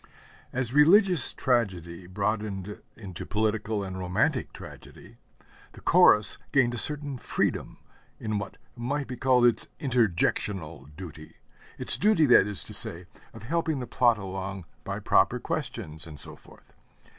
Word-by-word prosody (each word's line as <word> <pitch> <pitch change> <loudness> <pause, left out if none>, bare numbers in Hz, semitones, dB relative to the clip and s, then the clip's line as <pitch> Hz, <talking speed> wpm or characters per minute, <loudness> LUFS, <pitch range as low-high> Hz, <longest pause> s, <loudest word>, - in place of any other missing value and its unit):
As 125 -1 -3
religious 175 - +5
tragedy 95 - -2
broadened 105 0 -3 0.2
into 95 -6 -8
political 110 0 -1
and 95 -1 -6
romantic 110 - -1
tragedy, - - -13 0.6
the - - -13
Chorus 105 0 +5
gained 125 -3 +3
a 120 - -4
certain 145 -1 -4
freedom - - -2 0.4
in 110 -2 -2
what 100 -1 -8 0.2
might 140 +4 -3
be 130 - -7
called 125 0 +3
its 120 - +2
interjectional 95 - -1
duty, 80 -4 -10 0.4
its - - +5
duty, 205 -7 +3
that 125 -6 +6
is 105 -2 0
to - - -10
say, 85 +2 -1 0.3
of 110 - -13
helping 160 +2 -1
the 125 - -4
plot 120 -1 +2
along 95 -1 -6 0.2
by - - -5
proper - - +2
questions, 80 +2 -4
and 75 -3 -10
so - - -3
forth. - - -20
110 Hz, 140 wpm, -27 LUFS, 95-130 Hz, 0.6 s, that